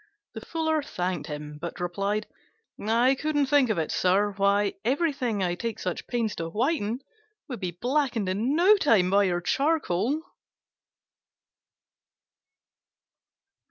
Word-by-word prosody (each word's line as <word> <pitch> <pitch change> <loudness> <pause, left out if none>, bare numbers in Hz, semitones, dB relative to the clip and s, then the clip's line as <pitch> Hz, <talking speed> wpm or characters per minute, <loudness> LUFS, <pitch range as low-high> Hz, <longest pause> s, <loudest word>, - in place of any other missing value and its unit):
The - - -7
Fuller 315 -1 -1
thanked 180 - -3
him, 150 -1 -7
but 170 - -6
replied, 200 +4 -1 0.6
"I 235 +5 +3
couldn't 290 +1 0
think 275 -2 +3
of 215 - 0
it, 160 -2 -1
sir: 195 +3 +2
why, 200 +1 +2
everything 255 - 0
I 175 -1 0
take 230 +4 -4
such 180 -2 -4
pains 230 -4 -1
to 165 0 -3
whiten 240 - -1 0.5
would 250 -7 -6
be 185 -2 -2
blackened 250 -5 0
in 220 +10 0
no 380 +6 +6
time 220 - +3
by 200 +1 +4
your 175 -2 0
charcoal." 275 - 0
215 Hz, 125 wpm, -26 LUFS, 185-275 Hz, 0.6 s, no